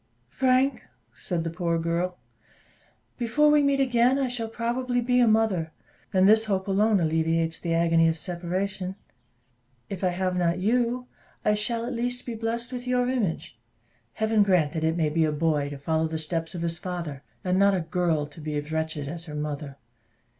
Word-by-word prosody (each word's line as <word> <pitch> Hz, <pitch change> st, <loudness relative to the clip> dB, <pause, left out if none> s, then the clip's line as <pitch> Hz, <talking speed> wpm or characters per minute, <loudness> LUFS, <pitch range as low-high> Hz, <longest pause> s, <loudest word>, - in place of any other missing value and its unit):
"Frank," 260 Hz, -, +2 dB, 0.3 s
said 175 Hz, -3 st, -3 dB
the 165 Hz, -, -3 dB
poor 170 Hz, -1 st, -1 dB
girl, 170 Hz, +2 st, -1 dB, 1.0 s
"before 295 Hz, +6 st, +3 dB
we 300 Hz, 0 st, +5 dB
meet 280 Hz, -1 st, +2 dB
again, 250 Hz, 0 st, +3 dB
I 270 Hz, -2 st, 0 dB
shall 235 Hz, -2 st, -3 dB
probably 245 Hz, +2 st, -1 dB
be 250 Hz, +1 st, +2 dB
a 240 Hz, -, +5 dB
mother; 215 Hz, -7 st, +2 dB, 0.4 s
and 190 Hz, -1 st, +4 dB
this 220 Hz, +1 st, +5 dB
hope 195 Hz, -2 st, -1 dB
alone 205 Hz, +1 st, +3 dB
alleviates 165 Hz, 0 st, 0 dB
the 165 Hz, -1 st, -1 dB
agony 165 Hz, -1 st, +4 dB
of 165 Hz, 0 st, +1 dB
separation. 185 Hz, +3 st, -3 dB, 1.0 s
If 195 Hz, -1 st, -5 dB
I -, -, +4 dB
have 180 Hz, +1 st, -1 dB
not 175 Hz, -1 st, +1 dB
you, 240 Hz, +5 st, +1 dB, 0.4 s
I 210 Hz, -, +4 dB
shall, 230 Hz, +2 st, -1 dB
at 250 Hz, -, -3 dB
least, 245 Hz, +1 st, -3 dB
be 240 Hz, -, -4 dB
blest 230 Hz, +2 st, -3 dB
with 250 Hz, 0 st, -5 dB
your 250 Hz, 0 st, +2 dB
image. 175 Hz, -, -2 dB, 0.5 s
Heaven 220 Hz, 0 st, +2 dB
grant 180 Hz, -7 st, +3 dB
that 160 Hz, -, -2 dB
it 160 Hz, +1 st, +1 dB
may 160 Hz, -3 st, +2 dB
be 160 Hz, +2 st, +2 dB
a 155 Hz, -, +2 dB
boy, 150 Hz, -2 st, 0 dB
to 145 Hz, -, -7 dB
follow 160 Hz, +3 st, 0 dB
the 160 Hz, 0 st, -3 dB
steps 165 Hz, +2 st, -3 dB
of 170 Hz, -, -4 dB
his 170 Hz, 0 st, -3 dB
father, 170 Hz, -7 st, -5 dB, 0.2 s
and 185 Hz, +1 st, +1 dB
not 200 Hz, 0 st, +5 dB
a 180 Hz, -, 0 dB
girl, 165 Hz, -3 st, 0 dB
to 150 Hz, +2 st, -13 dB
be 150 Hz, 0 st, -4 dB
as 145 Hz, +1 st, -4 dB
wretched 160 Hz, -2 st, -2 dB
as 165 Hz, +3 st, -6 dB
her 150 Hz, -3 st, -8 dB
mother. 150 Hz, -2 st, -4 dB
180 Hz, 190 wpm, -26 LUFS, 160-230 Hz, 1.0 s, we